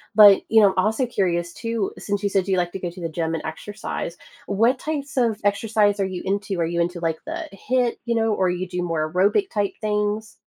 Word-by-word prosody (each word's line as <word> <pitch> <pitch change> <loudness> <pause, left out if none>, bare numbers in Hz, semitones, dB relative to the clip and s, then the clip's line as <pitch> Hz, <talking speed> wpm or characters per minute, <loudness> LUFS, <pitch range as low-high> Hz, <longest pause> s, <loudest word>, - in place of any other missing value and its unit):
But, 205 -2 +9
you 220 0 +6
know, 205 - +7
I'm - - -3
also 220 +5 +1
curious 175 -7 -1
too, 230 -3 -2
since 205 0 -3
you 200 - +2
said 195 -1 +1
you 190 -1 +1
like 175 -1 0
to 195 - -6
go 180 - -3
to 175 +1 -11
the 165 - -1
gym 160 0 -2
and 160 - -5
exercise, 175 +1 -5 0.3
what 230 +6 +2
types 285 -3 -4
of 230 -4 +2
exercise 205 0 +2
are 195 - +2
you 185 -2 -4
into? 195 -1 -1
Are 165 - +2
you 170 +1 -1
into 175 +1 -2
like 165 -1 -1
the 325 +1 -5
HIIT, 245 +4 0
you 235 -1 0
know, 225 -1 +2
or 190 -3 +1
you 180 +1 -2
do 180 0 -3
more 155 -3 -1
aerobic 205 - +2
type 205 -2 0
things? 210 0 -2
200 Hz, 235 wpm, -23 LUFS, 180-220 Hz, 0.3 s, But